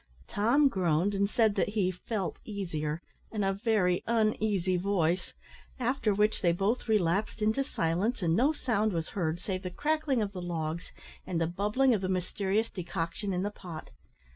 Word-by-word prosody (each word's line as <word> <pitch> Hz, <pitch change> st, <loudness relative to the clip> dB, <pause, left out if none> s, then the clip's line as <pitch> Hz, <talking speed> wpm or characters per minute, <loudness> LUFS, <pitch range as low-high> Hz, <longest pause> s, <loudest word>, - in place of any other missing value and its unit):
Tom 240 Hz, +8 st, +3 dB
groaned, 185 Hz, -, +1 dB
and 200 Hz, 0 st, +1 dB
said 220 Hz, -1 st, +3 dB
that 200 Hz, -, +1 dB
he 205 Hz, -3 st, +1 dB
"felt 190 Hz, +1 st, -4 dB
easier," 170 Hz, -6 st, -3 dB, 0.3 s
in 215 Hz, -2 st, -1 dB
a 195 Hz, 0 st, +2 dB
very 195 Hz, -4 st, +1 dB
uneasy 215 Hz, -5 st, +1 dB
voice, 180 Hz, -2 st, 0 dB, 0.4 s
after 245 Hz, -3 st, +1 dB
which 210 Hz, +2 st, +2 dB
they 175 Hz, -4 st, +4 dB
both 200 Hz, +9 st, 0 dB
relapsed 205 Hz, 0 st, +1 dB
into 220 Hz, +5 st, +2 dB
silence, 190 Hz, -, -1 dB
and 165 Hz, -1 st, +3 dB
no 265 Hz, -, +4 dB
sound 220 Hz, -8 st, 0 dB
was 165 Hz, -2 st, -2 dB
heard 170 Hz, -3 st, -1 dB
save 185 Hz, 0 st, -3 dB
the 185 Hz, -, -4 dB
crackling 295 Hz, -, 0 dB
of 200 Hz, -, -3 dB
the 185 Hz, -2 st, -6 dB
logs 165 Hz, -1 st, -3 dB, 0.4 s
and 175 Hz, -3 st, -1 dB
the 165 Hz, -, +2 dB
bubbling 210 Hz, +10 st, +2 dB
of 210 Hz, -, 0 dB
the 185 Hz, -, -2 dB
mysterious 190 Hz, +4 st, 0 dB
decoction 175 Hz, +2 st, -3 dB
in 180 Hz, 0 st, 0 dB
the 205 Hz, -, -1 dB
pot. 175 Hz, -6 st, -9 dB
195 Hz, 170 wpm, -30 LUFS, 175-220 Hz, 0.4 s, they